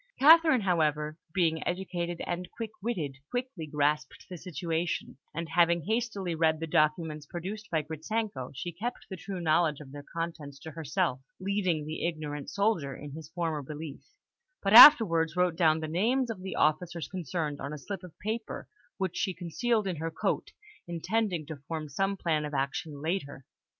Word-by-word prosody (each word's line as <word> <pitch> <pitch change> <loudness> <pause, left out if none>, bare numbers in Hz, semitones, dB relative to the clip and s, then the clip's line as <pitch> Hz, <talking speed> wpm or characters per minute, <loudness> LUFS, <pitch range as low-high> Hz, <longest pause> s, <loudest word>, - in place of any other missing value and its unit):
Catherine, 315 -2 +7
however, 155 -4 +1
being 160 -2 +1
educated 175 -2 -3
and 175 +1 -3
quick 225 -2 -6
witted, 165 - -2
quickly 245 -10 -4
grasped 150 +1 0
the 180 - -7
situation, 165 -3 -3
and 165 +2 -4
having 170 +1 +3
hastily 215 -5 -1
read 160 -1 +2
the 165 - -2
documents 155 -1 +1
produced 200 +7 -6
by 160 -2 0
Gritzenko, 160 - -3
she 175 +6 -4
kept 235 +8 -5
the - - -3
true 190 +1 -6
knowledge 160 -2 +2
of 140 -3 -11
their 145 0 -8
contents 165 -2 -5
to 160 - -8
herself, 155 -2 -1 0.2
leaving 185 -5 0
the 155 +1 -4
ignorant 150 -3 -4
soldier 200 -10 0
in 145 0 -9
his 155 +1 -9
former 165 -3 -2
belief, 150 +1 -7 0.6
but 195 - +2
afterwards 190 - +10
wrote 180 -2 +2
down 160 -2 +3
the 155 - -3
names 230 +10 +1
of 195 -5 -7
the 190 0 -5
officers 165 +2 +1
concerned 160 -4 -3
on 140 +1 -4
a 150 - -5
slip 185 +6 -6
of 180 -3 -12
paper, 220 +2 -4 0.3
which 185 -2 -2
she 190 -3 -1
concealed 210 +6 0
in 185 -4 -2
her 165 +2 -2
coat, 160 - -2 0.4
intending 175 0 -1
to 155 +1 -7
form 160 -2 -4
some 195 +8 -1
plan 160 -4 0
of 150 -1 -4
action 140 +2 -2
later. 155 -6 -3
165 Hz, 170 wpm, -29 LUFS, 155-190 Hz, 0.6 s, afterwards